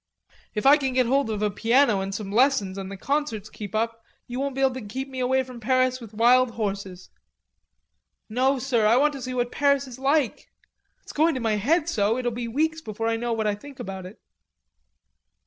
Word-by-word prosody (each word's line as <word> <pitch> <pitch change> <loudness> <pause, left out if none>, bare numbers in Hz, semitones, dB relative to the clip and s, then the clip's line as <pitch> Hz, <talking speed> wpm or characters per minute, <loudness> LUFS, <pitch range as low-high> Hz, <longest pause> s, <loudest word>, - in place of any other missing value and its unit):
"If 210 - -2
I 285 +2 +8
can 270 -3 -2
get 255 0 +3
hold 270 +1 +1
of 215 -1 -2
a 210 - +1
piano 230 0 +3
and 195 0 -4
some 200 -2 -5
lessons 230 -5 +2
and 190 0 -6
the 195 - -7
concerts 250 -4 -2
keep 205 -1 -7
up 225 +1 -1 0.2
you 245 +1 -5
won't 275 -1 -2
be 270 - -2
able 265 -1 +3
to 260 - -6
get 255 +6 -5
me 260 -1 -7
away 260 +1 +2
from 250 -2 -10
Paris 255 +2 +1
with 220 -2 -11
wild 245 +2 +4
horses. 195 -4 -4 1.2
No, 260 +5 +1
sir, 245 -4 +1
I 230 +3 +5
want 295 +2 +3
to 275 - -7
see 255 0 -4
what 245 -1 -1
Paris 280 -1 +2
is 255 -1 -10
like.... 275 -1 0 0.6
It's - - -11
going 320 +1 +2
to - - -2
my 220 -3 0
head 305 - +1
so 220 -7 +1
it'll 245 -1 -1
be 235 +1 -4
weeks 315 +6 0
before 225 -3 -4
I 230 - +1
know 235 +1 -2
what 220 -1 -1
I 210 - +2
think 270 +6 -11
about 190 -5 -6
it." 200 - -14
245 Hz, 215 wpm, -25 LUFS, 215-270 Hz, 1.2 s, I